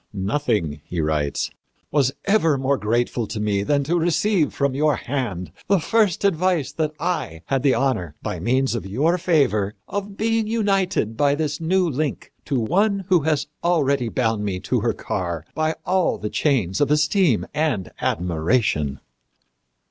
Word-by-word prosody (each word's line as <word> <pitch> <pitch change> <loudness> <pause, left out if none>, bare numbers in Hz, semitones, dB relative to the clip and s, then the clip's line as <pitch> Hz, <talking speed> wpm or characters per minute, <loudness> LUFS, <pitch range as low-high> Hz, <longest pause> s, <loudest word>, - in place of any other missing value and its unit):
"Nothing," 95 - -1
he 85 +2 -5
writes, 75 -2 -1 0.4
"was 140 -3 +3
ever 195 -8 +3
more 135 +1 +1
grateful 115 +2 0
to 110 - -5
me 105 -2 0
than 140 +7 +1
to 170 +5 +1
receive 175 0 +2
from 140 -1 0
your 150 +1 +2
hand 115 -10 -3 0.2
the 195 -1 +4
first 205 +1 +1
advice 175 -6 +1
that 155 0 -2
I 150 - -2
had 135 -1 0
the 135 -1 +3
honor, 105 - -1
by - - -3
means 130 +2 +1
of 115 -5 -4
your 155 - +1
favor, 110 - +2
of 200 0 -5
being 225 0 +1
united 195 - 0
by 140 +3 +3
this 150 0 -2
new 180 +2 +2
link 150 0 -3
to 135 -4 0
one 195 - +1
who 180 -2 +5
had 155 -1 0 0.2
already 140 -8 +2
bound 110 -3 0
me 95 -3 -2
to - - 0
her - - 0
car 85 -3 -4
by 155 0 0
all 185 -1 +1
the 105 - -5
chains 120 - +1
of 145 - +3
esteem 150 - +3
and 150 - -1
admiration." 80 - 0
140 Hz, 160 wpm, -22 LUFS, 105-170 Hz, 0.4 s, who